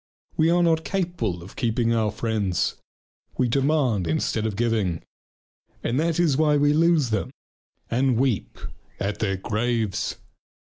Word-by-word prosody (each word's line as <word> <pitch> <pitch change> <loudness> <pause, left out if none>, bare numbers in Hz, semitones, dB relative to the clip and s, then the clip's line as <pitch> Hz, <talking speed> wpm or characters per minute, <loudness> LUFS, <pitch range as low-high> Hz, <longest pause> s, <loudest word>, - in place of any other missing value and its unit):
We 160 +1 +3
are 175 +1 +3
not 160 -1 +2
capable 165 - -2
of 95 - -13
keeping 115 -2 +1
our 110 -2 +1
friends. 105 -4 -1 0.6
We 125 - +2
demand 130 - +1
instead 105 +7 0
of 105 - -4
giving. 105 -7 0 0.8
And 125 +4 0
that 165 +1 0
is 155 -6 +3
why 150 -1 +3
we 145 0 +3
lose 160 -5 +3
them 110 +3 -1 0.6
and 125 0 +2
weep 125 -5 0 0.4
at 100 +1 -2
their 95 -3 0
graves. 110 0 -1
120 Hz, 140 wpm, -24 LUFS, 105-150 Hz, 0.8 s, We